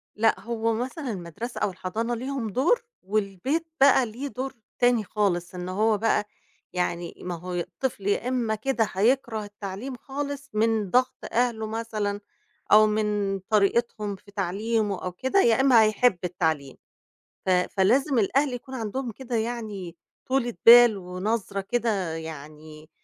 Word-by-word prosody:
لأ، 225 +1 +2
هو 230 -1 -1
مثلًا 255 +3 -3
المدرسة 200 +6 -6
أو - - +2
الحضانة 225 +7 -3
ليهم 255 -2 -3
دور، 330 - +2 0.2
والبيت 215 - -1
بقى 270 -2 +6
ليه 245 +6 -6
دور 265 0 -5 0.3
تاني 245 -3 +3
خالص، 180 -3 -1
إن 180 0 -5
هو 215 +3 +2
بقى، 210 -1 +1 0.5
يعني 175 -1 -2
ما 180 -1 -4
هو 180 +2 -7
الطفل 190 +4 -3
يا 215 +4 +1
إمّا 240 -4 0
كده 225 0 0
هيكره 225 +1 +1
التعليم 205 +5 -7
خالص 285 +2 -5
من 220 -2 +1
ضغط 255 +1 +3 0.2
أهله، 230 -2 0
مثلًا، 215 -2 -3 0.5
أو 215 +1 +8
من 210 -2 0
طريقتهم 210 +1 +1
في 200 +2 -18
تعليمه 205 +1 -1
أو 180 - -2
كده، 260 - +1
يا 235 +3 +4
إمّا 245 -5 +6
هيحب 215 -1 +3
التعليم، 160 -6 -1 0.7
ف - - -1
فلازِم 210 +9 +2
الأهل 265 +6 +2
يكون 260 +2 -7
عندهم 235 +2 -3
كده، 250 +1 -6
يعني، 215 -7 -4 0.3
طولة 255 -2 0
بال، 235 -2 +9
ونَظْرة 195 +2 -3
كده، 200 -6 -1
يعني 155 0 -9
215 Hz, 140 wpm, -26 LUFS, 190-245 Hz, 0.7 s, بال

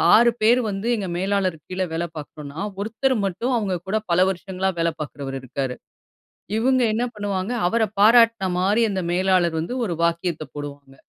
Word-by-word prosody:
6 235 +2 +6
பேர் 235 +3 +5
வந்து 195 +2 -3
எங்க 205 -4 -3
மேலாளர் 190 -2 0
கீழ 185 +1 -2
வேல 165 +1 -1
பார்க்குறோன்னா, 150 0 -8 0.2
ஒருத்தர் 230 +6 0
மட்டும் 195 +7 -1
அவுங்க 200 -5 -1
கூட 205 +3 +1
பல 170 - +3
வருஷங்களா 190 0 -2
வேல 165 0 +2
பார்க்குறவரு 140 -2 -5
இருக்காரு. 130 0 -3 0.8
இவுங்க 255 +3 +3
என்ன 230 +3 0
பண்ணுவாங்க? 200 0 -2 0.2
அவர 225 +4 +2 0.2
பாராட்னமாரி 210 -3 +4
அந்த 190 -2 -1
மேலாளர் 180 -1 +2
வந்து 165 +9 -3
ஒரு 190 -7 -1
வாக்கியத்த 170 -1 0
போடுவாங்க. 145 -2 -8
190 Hz, 150 wpm, -23 LUFS, 170-220 Hz, 0.8 s, 6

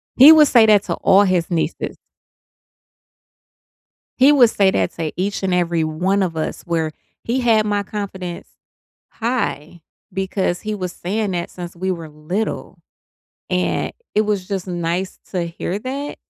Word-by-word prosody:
He 280 +5 +10
would 305 -2 +7
say 235 -3 +6
that 210 -2 +5
to - - -3
all 200 +2 +4
his 185 -3 0
nieces. 165 -1 -2 2.2
He 270 +3 +7
would 250 -6 +6
say 195 -3 +3
that - - 0
to 160 -2 -3
each 195 +2 -2
and 185 - +1
every 170 -2 +1
one 185 +6 0
of 170 -3 -3
us 155 - -3
where 165 -2 -1 0.3
he 240 +3 -1
had 225 -3 +3
my 205 -1 0
confidence 190 -4 -6 0.6
high 180 - -3 0.3
because 190 -1 -2
he 215 0 -3
was 185 -3 -4
saying 200 +3 -2
that 175 -1 -3
since 175 -1 -8
we 185 +2 -2
were 165 -3 -6
little, 155 +9 -4 0.7
and 180 0 0 0.2
it 215 - +3
was 205 -3 -1
just 195 -2 -3
nice 175 +2 -3
to 180 -3 -1
hear 175 +3 -4
that, 275 +4 -5
190 Hz, 155 wpm, -20 LUFS, 175-215 Hz, 2.2 s, He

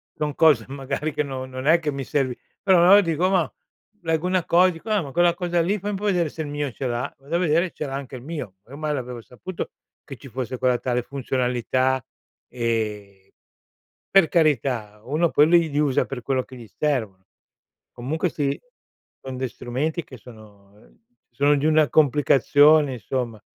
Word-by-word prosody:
son 150 -1 -2
cose 145 -9 +4
magari 140 +2 -4
che 150 0 0
non 130 -2 -6
non 130 +2 -5
è 170 +2 +6
che 155 -2 -2
mi 140 -1 -4
servi, 130 -3 -1 0.3
però 190 -2 +5
allora 200 +3 +8
dico: 170 +1 0
"Ma" 185 -5 +1 0.5
leggo 165 +1 0
una 185 -2 +1
cosa 180 +2 +5
dico: 165 +6 -10
"Ah, 210 -3 +2
ma 140 - -8
quella 175 0 +4
cosa 175 -1 0
lì 195 +5 0
fai 205 +2 -3
un 200 - -2
po' 205 - -9
vedere 175 -6 +1
se 160 - -7
il - - -6
mio 145 0 -3
ce 135 - -6
l'ha." 120 +1 -2
Vado 140 +5 -5
a - - -1
vedere 170 0 +2
e - - -13
ce 150 - -5
l'ha 135 - -6
anche 135 -1 -6
il - - -11
mio. 150 - -6
Ormai 150 +4 -4
l'avevo 125 -3 -5
saputo 165 +10 -7 0.3
che 135 -4 -10
ci 125 - -13
fosse 130 +1 -4
quella 125 -1 +2
tale 125 -1 -1
funzionalità, 130 -1 -1 0.5
ehm, 105 -5 -3 0.8
per 195 -4 +6
carità, 125 - 0
uno 155 +6 +1
poi 150 - +5
li 170 -2 +4
li 145 - 0
usa 145 -3 +2
per 125 -3 -6
quello 130 -2 0
che 130 - -13
gli 115 - -11
servono. 110 -11 -1 0.7
Comunque 155 +8 -2
sì, 140 -3 -2 0.7
son 130 -1 -5
dei 130 - -2
strumenti 150 +10 -3
che 130 - -12
sono, 105 -4 -16
ehm, 105 - -23 0.3
sono 145 +4 +3
di 145 - -1
una 155 -1 +4
complicazione, 145 0 +4
insomma. 120 -3 -4
140 Hz, 195 wpm, -23 LUFS, 125-160 Hz, 0.8 s, allora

